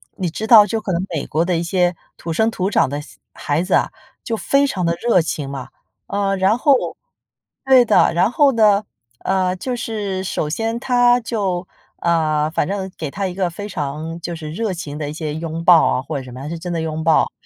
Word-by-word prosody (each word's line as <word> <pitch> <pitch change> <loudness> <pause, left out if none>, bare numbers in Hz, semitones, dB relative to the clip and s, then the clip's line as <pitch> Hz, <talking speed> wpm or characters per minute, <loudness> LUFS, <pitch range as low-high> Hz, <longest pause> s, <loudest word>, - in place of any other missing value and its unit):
你 180 -4 -2
知 215 +7 -5
道 220 -3 +9
就 225 - -1
可 205 -3 -4
能 175 +2 0
美 150 - -2
国 160 +3 +1
的 175 -1 0
一 170 - -1
些 175 0 +1 0.2
土 165 - -6
生 220 +6 +2
土 190 -2 -1
长 205 - +3
的 145 +1 -4
小 150 - -15 0.2
孩 145 +3 -1
子 185 - -2
啊， - - +1 0.3
就 225 -1 -2
非 275 +8 +2
常 185 -8 -2
地 170 0 +1
热 230 -7 +3
情 145 -3 -4
嘛。 135 -2 -6 0.4
呃， 200 -1 0
然 195 +5 +3
后 280 +1 +4 0.9
对 260 -2 +6
的， 210 -5 +4
然 185 +6 +3
后 285 0 +4
呢， 210 -2 +4 0.3
呃， 185 -1 0
就 250 +7 -4
是 205 -5 -3
首 155 -5 -2
先 225 +7 -2
他 245 -1 +3
就 195 -6 -2 0.3
呃， 155 -3 +1
反 160 - 0
正 190 -1 -3
给 150 -3 -4
他 195 -1 -2
一 180 - -6
个 190 -2 0
非 205 +5 -7
常 155 0 -4
就 170 0 -4
是 155 -2 -7
热 205 +2 -2
情 150 -4 -6
的 150 -1 -4
一 - - -6
些 155 -2 -4
拥 165 0 -4
抱 175 -3 +6
啊 130 - +1
或 145 +1 -5
者 135 - -5
什 125 - -11
么， 130 +2 -9
他 145 - -6
是 170 - -4
真 175 0 -5
的 165 - -1
拥 160 0 -3
抱。 160 0 +3
180 Hz, 245 characters per minute, -19 LUFS, 160-210 Hz, 0.9 s, 道